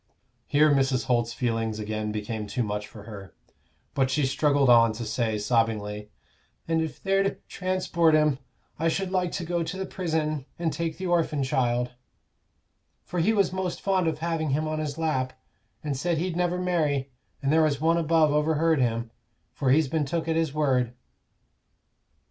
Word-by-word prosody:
Here 150 +1 +4
Mrs. 135 -2 +2
Holt's 120 -2 +1
feelings 115 -2 -1
again 110 0 -3
became 105 0 -4
too 105 +5 -1
much 105 -1 -3
for 105 0 -12
her, 100 -3 -10 0.6
but 130 -1 +1
she 145 +1 +1
struggled 140 0 +2
on 115 -2 +6
to 115 +2 -5
say, 110 0 -1
sobbingly, 105 -2 0 0.6
"And 165 0 +1
if 160 -2 -5
they're 195 0 +2
to 195 - 0
transport 180 -3 +1
him, 150 -3 +3 0.4
I 165 - +1
should 185 +3 -1
like 180 -2 0
to 175 - -3
go 170 +1 -1
to 165 +3 -4
the 190 - -3
prison 155 -6 -2
and 165 -2 -1
take 165 -1 -3
the 185 - -5
orphin 165 -5 +1
child; 125 -1 0 1.1
for 180 - -4
he 170 +7 +3
was 200 -4 +2
most 185 -1 -2
fond 190 -3 +1
of 160 -2 0
having 160 -1 -1
him 155 +3 0
on 155 0 -2
his 150 -1 -3
lap, 130 -6 -1 0.5
and 145 -2 -2
said 170 +5 0
he'd 175 +1 -2
never 175 0 0
marry; 150 -7 0 0.3
and 140 +2 +2
there 160 - +5
was 150 -3 +2
One 165 +2 +3
above 160 -2 +3
overheard 155 0 +2
him, 115 -1 -1 0.4
for 135 - -1
he's 150 +3 +4
been 150 +2 0
took 165 +3 -2
at 160 - +1
his 165 -3 +1
word." 130 -5 +1
150 Hz, 180 wpm, -26 LUFS, 120-165 Hz, 1.1 s, on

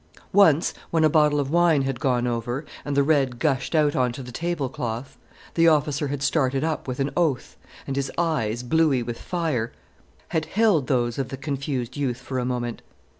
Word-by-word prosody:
Once, 170 -6 +5 0.2
when 165 -1 +2
a 155 - +6
bottle 150 -2 +4
of 140 0 -2
wine 170 -4 +4
had 135 -2 -2
gone 125 -3 +1
over, 120 +4 -2 0.2
and 145 -1 -2
the 140 - +5
red 135 -4 +2
gushed 135 +2 0
out 150 -2 +3
on 125 -1 +2
to 130 +2 -7
the 125 - -9
tablecloth, 135 -6 -3 0.4
the 165 0 +4
officer 150 -2 +2
had 140 0 -3
started 135 -1 +1
up 160 -3 -2
with 130 0 -4
an 135 +1 0
oath, 160 -8 0 0.3
and 135 - -3
his 135 0 -2
eyes, 125 -9 0
bluey 145 -2 +2
like 120 0 -4
fire, 155 -8 -2 0.6
had 160 -3 0
held 190 - +2
those 120 -2 0
of 130 -2 -2
the 135 - -5
confused 135 -3 -3
youth 130 -4 -1
for 130 0 -4
a 125 - -1
moment. 120 -2 -3
135 Hz, 190 wpm, -24 LUFS, 125-155 Hz, 0.6 s, a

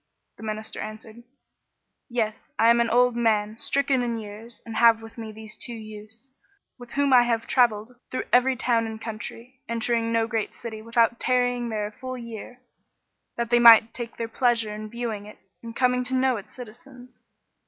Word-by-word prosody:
The - - -14
Minister 215 0 -5
answered, 215 +1 -8 0.9
"Yes; 225 -3 -3
I 230 +1 +6
am 235 0 +4
an 235 - +1
old 245 0 +3
man, 220 -2 +1
stricken 275 -2 +1
in 235 -1 -2
years, 220 +2 -10
and 225 -1 -6
have 230 -1 +5
with 225 0 -12
me 225 -2 -7
these 215 0 -9
two 240 - -7
youths, 215 +3 -11 0.5
with 245 -1 -12
whom 280 -1 +2
I 250 - +8
have 230 -1 0
travelled 240 -1 +1
through 255 - -3
every 255 +1 +4
town 230 -1 +1
and 220 0 -7
country, 230 +3 -8
entering 230 0 0
no 230 -1 +2
great 225 -2 -3
city 220 -2 -7
without 230 +1 +1
tarrying 245 -1 +1
there 215 -2 -2
a 210 - -6
full 255 +3 -7
year, 235 +1 -9 0.7
that 235 0 -2
they 240 - +5
might 230 -1 +8
take 235 -1 -7
their 230 - -3
pleasure 230 -2 +1
in 215 0 -7
viewing 225 -3 -5
it 210 - -12 0.2
and 230 0 -9
come 250 0 +2
to 260 - 0
know 260 0 +2
its 200 - -11
citizens. 250 +1 -13
230 Hz, 185 wpm, -25 LUFS, 220-245 Hz, 0.9 s, I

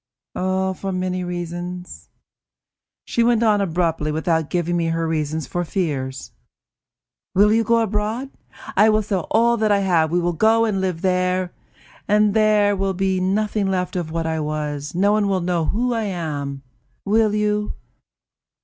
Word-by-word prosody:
"For 190 +1 -1
many 185 0 -2
reasons." 175 0 -6
And - - -48 0.8
she 235 - +1
went 235 -1 +3
on 210 -2 +3
abruptly, 165 -4 0
without 160 0 0
giving 175 -1 -1
me 170 -1 0
her 165 0 -1
reasons 155 -1 -2
for 175 +7 -2
fears: 140 -7 -3 1.0
"Will 205 +3 +5
you 225 0 +3
go 230 +1 +3
abroad? 220 +5 -2 0.4
I 215 - +5
will 215 0 +2
sell 195 -4 -2
all 235 +1 +3
that 215 -1 +1
I 200 -1 +3
have; 170 -5 +2
we 175 +2 +1
will 175 0 0
go 225 +6 +3
and 200 -4 -1
live 180 -3 -2
there, 185 -1 0 0.5
and 210 0 +3
there 210 -2 +3
will 195 -1 -1
be 190 0 0
nothing 205 +2 0
left 185 -1 -1
of 175 -3 -2
what 165 0 -2
I 160 0 -1
was; 150 -1 -4
no 200 +3 +3
one 210 -1 +2
will 195 -1 +1
know 170 -2 0
who 240 +8 0
I 225 -2 -1
am. 145 -7 -4 0.4
Will 215 +1 +2
you?" 210 0 0
185 Hz, 165 wpm, -21 LUFS, 165-210 Hz, 1.0 s, Will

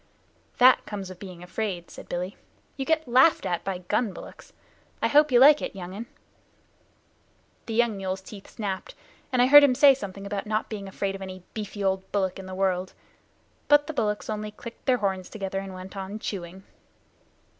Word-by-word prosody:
"That 255 +1 +6
comes 195 -3 -6
of 180 - -12
being 180 -3 -9
afraid," 180 -2 -4
said - - -11
Billy. 180 +2 -3 0.4
"You 270 - -4
get 320 -1 +1
laughed 260 +6 +5
at 175 -1 -1
by 195 -2 -3
gun 205 +4 -1
bullocks. - - -12 0.5
I - - +2
hope 295 0 +4
you 245 - +6
like 290 +3 +8
it, - - -5
young 185 -1 -7
un." 225 +4 -7 1.6
The 225 - -3
young 235 -3 +2
mule's 190 0 -3
teeth 195 0 -11
snapped, 200 -4 -5 0.4
and 250 -1 +4
I - - +6
heard 290 +2 +9
him 265 -3 +4
say 275 +1 +7
something 200 -6 -7
about 200 0 -4
not 215 0 -1
being 200 -2 -5
afraid 195 0 -3
of 195 - -8
any 185 -1 -8
beefy 210 -1 -5
old 190 0 -1
bullock 190 -2 -1
in 190 - -8
the 185 - -6
world. 185 -1 0 0.7
But 290 0 +5
the 315 - -5
bullocks 210 -6 -1
only 215 -1 -3
clicked 230 +5 -11
their 255 -1 +4
horns 190 -4 -2
together 195 -3 -4
and 195 0 -7
went 185 +1 -9
on 195 +2 -5
chewing. 190 -3 -6
200 Hz, 190 wpm, -26 LUFS, 190-235 Hz, 1.6 s, heard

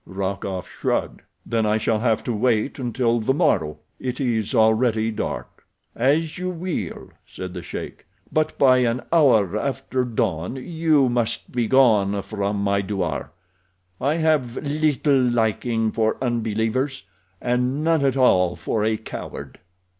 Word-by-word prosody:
Rokoff 95 -1 -4
shrugged. - - -2 0.2
"Then 115 -1 0
I 105 +1 +2
shall 110 0 0
have 115 -1 +1
to 120 - -2
wait 115 +4 0
until 120 -1 0
the 135 +5 +1
morrow—it 95 - -1
is 120 -3 -1
already 110 0 +3
dark." 110 - -5 0.3
"As 155 +7 +1
you 185 0 -2
will," 170 - -4
said 90 -1 -8
the 90 - -6
sheik. - - -8 0.3
"But 155 0 0
by 130 -2 +5
an 125 0 +1
hour 110 - +4
after 135 +1 -1
dawn 110 -5 -2
you 155 -1 +2
must 120 -2 -1
be 120 -2 0
gone 105 -6 +4
from 100 -1 -2
my 100 0 +1
douar. 95 -8 -3 0.7
I 140 +4 +1
have 155 -7 +1
little 145 -2 +2
liking 115 -1 +1
for 110 0 0
unbelievers, 120 +1 -1 0.4
and 125 +4 0
none 160 -2 +2
at 135 -1 +1
all 90 -9 +4
for 110 - -2
a 110 0 +1
coward." 110 - -8
120 Hz, 140 wpm, -23 LUFS, 105-135 Hz, 0.7 s, by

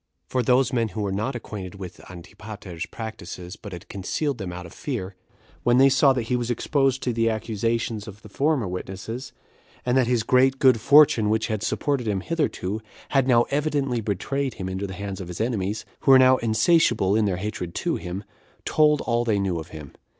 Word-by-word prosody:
For 130 - -1
those 125 +1 +3
men 115 -2 +1
who 110 0 -5
were 100 - -1
not 110 +7 -2
acquainted 100 -5 -7
with 95 -2 -9
Antipater's 90 0 -8
practices, 90 -4 -7
but 105 - -10
had 90 -2 -9
concealed 120 +8 -2
them 95 -3 -4
out 90 0 -7
of 85 - -12
fear, 100 -9 -5 0.5
when 120 0 +3
they 135 +1 +7
saw 135 +1 +5
that 125 -3 -1
he 125 +3 -1
was 120 -1 -2
exposed 135 +2 +1
to 125 - 0
the 115 0 +2
accusations 110 0 -2
of 105 0 -11
the - - -10
former 140 +1 0
witnesses, 95 +7 -6 0.5
and 125 0 +1
that 130 -2 +3
his 120 -2 +1
great 130 +3 +3
good 130 -5 +4
fortune, 140 -6 +6
which 110 +1 0
had 110 -2 -2
supported 135 0 -1
him 100 -3 0
hitherto, 110 - -2 0.3
had 135 -2 +2
now 120 -2 +5
evidently 140 -4 0
betrayed 130 +7 -2
him 95 -2 -5
into 95 +2 -3
the 95 - -7
hands 100 -1 -5
of 90 - -7
his 90 -1 -7
enemies, 110 -2 -2
who - - -1
were 135 - +10
now 130 0 +6
insatiable 115 - +3
in 110 -1 +3
their 95 -3 0
hatred 90 -3 -5
to - - -1
him, 90 +3 -6 0.4
told 150 -1 +3
all 120 0 0
they 110 -3 +1
knew 95 -4 -1
of 80 - -8
him. 75 -5 -10
110 Hz, 200 wpm, -24 LUFS, 95-130 Hz, 0.5 s, were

